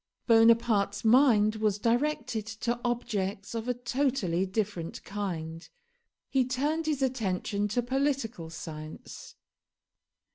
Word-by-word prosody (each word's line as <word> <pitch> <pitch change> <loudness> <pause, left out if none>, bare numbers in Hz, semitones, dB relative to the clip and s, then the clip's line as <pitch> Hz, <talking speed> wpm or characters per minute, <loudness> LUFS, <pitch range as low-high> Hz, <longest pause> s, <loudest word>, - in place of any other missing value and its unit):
Bonaparte's 225 -2 +4
mind 220 -3 +5
was 215 -2 +1
directed 235 -1 0
to 235 +2 -3
objects 205 -5 -2
of 230 +1 -4
a 250 - 0
totally 240 -8 0
different 190 -4 -3
kind. 170 -5 -5 0.6
He 265 -1 +2
turned 290 +6 -1
his 290 -3 0
attention 205 -5 -1
to 240 +4 0
political 260 - -1
science. 155 -1 -9
225 Hz, 105 wpm, -29 LUFS, 200-250 Hz, 0.6 s, mind